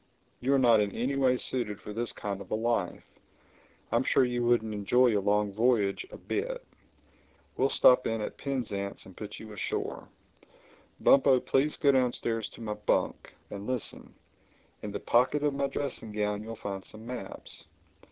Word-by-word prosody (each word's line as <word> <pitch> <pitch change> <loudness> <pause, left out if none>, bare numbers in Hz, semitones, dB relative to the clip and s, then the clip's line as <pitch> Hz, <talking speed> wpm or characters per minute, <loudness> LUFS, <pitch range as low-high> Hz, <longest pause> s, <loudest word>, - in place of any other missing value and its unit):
You 130 - 0
are - - +5
not 120 -4 +5
in 105 -1 +1
any 130 +4 -1
way 130 -2 +3
suited 115 -6 -2
to 105 - -7
this 115 +1 -1
kind 100 -1 -4
of - - -10
a - - 0
life. 115 +2 -1 0.9
I'm - - +3
sure 130 - +4
you 120 -1 -1
wouldn't 120 -2 +2
enjoy 115 +3 +3
a 100 - +2
long 105 0 +1
voyage 110 - +2
a - - -10
bit. - - -3 0.9
We'll 135 - +2
stop 125 -1 +5
in 115 0 -1
at 105 - -4
Penzance 110 -8 -4
and 95 - -13
put 105 -1 -7
you 110 -1 -10
ashore. 105 - -4 0.9
Bumpo, 135 -1 +6
please 140 +4 +1
go 140 - +4
downstairs 120 -4 0
to - - -12
my 105 -2 -3
bunk; 105 0 -1 0.2
and 100 0 -6
listen: 130 -2 -3 0.7
in 105 - -5
the 100 - -4
pocket 130 +5 +2
of 145 -1 +2
my 140 0 0
dressing 135 -5 -4
gown 105 0 -1
you'll 115 +1 -6
find 100 -3 -5
some 110 +1 -12
maps. 125 0 -7
115 Hz, 170 wpm, -29 LUFS, 105-130 Hz, 0.9 s, Bumpo